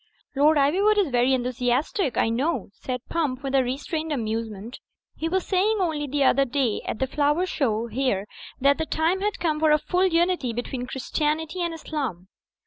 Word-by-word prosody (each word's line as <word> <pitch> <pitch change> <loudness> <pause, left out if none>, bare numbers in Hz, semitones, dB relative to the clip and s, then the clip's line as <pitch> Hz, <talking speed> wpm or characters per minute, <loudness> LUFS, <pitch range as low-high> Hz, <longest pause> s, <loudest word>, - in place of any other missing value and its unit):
'* - - -41
"Lord 300 +3 +4
Ivywood 380 +10 +3
is 395 -7 +3
very 245 +1 +3
enthusiastic, 255 - 0
I - - +3
know/' 255 - -1
said 250 +2 -5
Pump, 290 -5 -2
with 270 -1 -3
a 270 -1 +4
restrained 310 +5 -3
amusement. 225 -3 -4 0.4
"He 325 - -2
was 375 +1 0
saying 410 +3 +2
only 315 -5 -1
the 285 +1 0
other 275 +1 +4
day 260 -4 0
at - - -2
the 265 - 0
Flower 295 +6 +1
Show 235 -10 0
here 230 -4 -1 0.3
that 280 +2 +3
the 320 - -1
time 330 +4 +1
had 415 0 -1
come 310 -3 0
for 315 0 +3
a 300 - +6
full 365 +5 +1
unity 340 -7 +1
between 245 +1 -4
Christianity 310 +6 -2
and 340 -1 -1
Islam." 270 - -5
285 Hz, 185 wpm, -25 LUFS, 250-325 Hz, 0.4 s, a